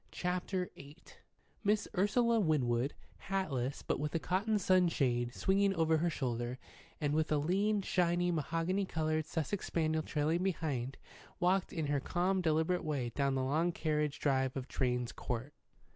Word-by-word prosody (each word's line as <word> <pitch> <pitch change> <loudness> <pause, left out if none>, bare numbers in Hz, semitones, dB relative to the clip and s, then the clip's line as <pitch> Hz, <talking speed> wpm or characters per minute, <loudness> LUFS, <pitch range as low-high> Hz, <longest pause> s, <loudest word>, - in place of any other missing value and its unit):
CHAPTER 180 +1 -2
VIII 140 +2 -12 0.7
MISS 210 0 +2
URSULA 230 +4 +3
WINWOOD, 135 - +1 0.4
hatless, 140 -10 -1
but - - -1
with 150 +2 -2
a - - +2
cotton 200 +6 +1
sunshade 140 -11 +2
swinging 195 0 +2
over 160 -1 +3
her 170 +2 +1
shoulder, 125 -4 -2 0.4
and 145 -1 0
with 155 0 +1
a 150 - +4
lean, 195 +7 +1
shiny, 175 -1 +2
mahogany 165 +5 0
coloured 155 -2 -1
Sussex 165 +5 -2
spaniel 160 -1 +1
trailing 155 +3 0
behind, 145 -9 -2 0.4
walked 185 +1 +2
in 160 -2 -2
her 145 0 +1
calm, 185 +6 0
deliberate 160 +2 +1
way 140 -6 -1
down 140 +2 0
the 130 - 0
long 155 +6 +1
carriage 150 -3 -1
drive 135 -2 +1
of 130 0 -4
Drane's 125 -2 -1
Court. 125 +4 -4
160 Hz, 150 wpm, -34 LUFS, 140-180 Hz, 0.7 s, a